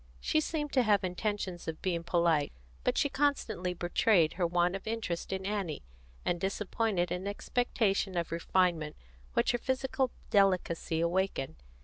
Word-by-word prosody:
She 310 - +2
seemed 295 -2 -3
to 260 - +5
have 210 -4 +3
intentions 185 -1 -3
of 160 -1 -4
being 170 -3 0
polite; 170 -4 +2 0.3
but - - +1
she - - +3
constantly 270 -11 0
betrayed 175 -1 +3
her 175 -1 +1
want 175 +1 +2
of 195 +3 -7
interest 220 -7 -3
in 190 0 -3
Annie, 195 -7 -2 0.4
and 175 -1 0
disappointed 195 -2 0
an 180 +2 -2
expectation 205 -3 0
of 170 - -1
refinement 170 -2 +1 0.4
which - - +3
her 240 - -1
physical 260 +1 0 0.2
delicacy 180 -5 +2
awakened. 170 -4 0
185 Hz, 145 wpm, -31 LUFS, 170-215 Hz, 0.4 s, to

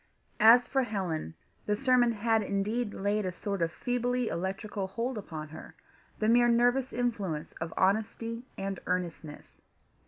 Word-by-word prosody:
As 235 +3 +8
for 270 - +1
Helen, 185 - -3 0.3
the 210 - +2
sermon 250 -1 +4
had 225 +1 +2
indeed 210 +3 -1
laid 205 +2 -1
a 185 - -2
sort 200 +1 -4
of 165 0 +1
feebly 245 +2 -1
electrical 190 +3 -3
hold 235 +6 -3
upon 155 -7 -6
her, 155 - -11 0.4
the 215 - 0
mere 240 +1 +5
nervous 245 +3 +3
influence 205 -11 -2
of 165 0 -3
honesty 220 +4 0 0.2
and 195 -1 -3
earnestness. 170 -4 -4
210 Hz, 145 wpm, -30 LUFS, 190-240 Hz, 0.4 s, As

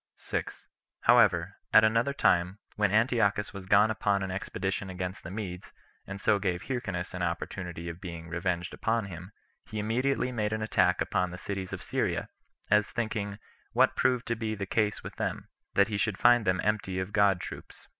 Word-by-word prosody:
6. - - -4 0.4
However, - - +4
at 110 - +8
another 115 +5 +3
time, 90 -8 +2 0.2
when 105 -2 +2
Antiochus 110 -2 +2
was 95 -2 -8
gone 105 +3 +5
upon 100 -2 +1
an 95 - -3
expedition 95 +1 -3
against 90 +1 -5
the - - -7
Medes, 95 -3 -6 0.4
and 95 +1 -6
so 105 0 +3
gave 90 -3 -1
Hyrcanus 95 -9 -3
an 90 - -4
opportunity 85 0 -3
of 85 +1 -7
being 85 -3 -7
revenged 85 +1 -2
upon 115 -1 0
him, 90 +1 -9 0.4
he 110 - -6
immediately 125 +5 0
made 110 -3 -1
an 110 0 -2
attack 110 - +2
upon 90 0 0
the 90 - -7
cities 95 0 -5
of - - -5
Syria, - - -1 0.4
as 105 -1 +4
thinking, 105 -3 -3 0.4
what - - +4
proved 125 -1 +2
to 120 - +1
be 110 -1 -3
the 100 -1 -4
case 105 +1 0
with - - -8
them, - - -3 0.3
that 100 +1 +4
he 105 - -1
should 110 -2 0
find 120 -2 +5
them 95 0 +2
empty 100 -3 0
of 95 +2 -3
good 100 -3 +4
troops. - - -9
100 Hz, 185 wpm, -29 LUFS, 90-110 Hz, 0.4 s, at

